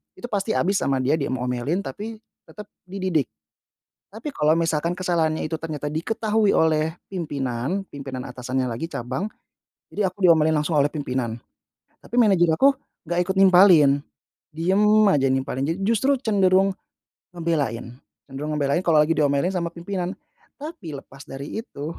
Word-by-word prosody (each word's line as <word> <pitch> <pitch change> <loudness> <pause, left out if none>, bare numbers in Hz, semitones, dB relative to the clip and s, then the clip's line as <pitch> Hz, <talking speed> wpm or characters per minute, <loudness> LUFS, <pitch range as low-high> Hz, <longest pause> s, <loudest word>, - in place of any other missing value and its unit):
Itu 245 - -9
pasti 205 +1 -1
habis 195 +2 +1
sama 135 -1 0
dia 150 +5 +2
di 140 - -1
m 130 - -2
omelin, 125 +9 -1
tapi 220 +3 -6 0.3
tetap 210 -1 -12 0.2
dididik. 185 -6 -1 0.8
Tapi 225 +9 -7
kalau 155 - +2
misalkan 165 +1 0
kesalahannya 170 -4 0
itu 155 +1 -3
ternyata 150 -2 -4
diketahui 215 +5 +1
oleh 160 0 +2 0.2
pimpinan, 145 -1 -3
pimpinan 135 -3 -6
atasannya 125 +1 -3
lagi 120 +8 -4
cabang. 140 - -4 0.6
Jadi 210 - 0
aku 185 +2 -6
diomelin 160 -2 +5
langsung 150 +1 +1
oleh 140 - +4
pimpinan, 130 -6 -2 0.7
tapi 235 - -9
manajer 185 -8 +4
aku 275 +10 +5 0.4
enggak 175 +1 0
ikut 190 - -1
nimpalin, 180 -7 +6 0.5
diem 180 +6 +1 0.3
aja 135 -8 +3
nimpalin 130 0 -1
ja - - 0
justru 265 +5 +2
cenderung 195 -4 +3 0.6
ngebelain, 140 -8 -2 0.3
cenderung 150 +3 -4
ngebelain 140 +1 +1
kalau 165 -2 +4
lagi 155 - -1
diomelin 145 +4 +2
sama 170 -2 -1
pimpinan. 180 +1 -4 0.4
Tapi 275 - -8
lepas 135 0 -11
dari 140 +2 -7
itu 155 - -7
160 Hz, 145 wpm, -23 LUFS, 140-190 Hz, 0.8 s, nimpalin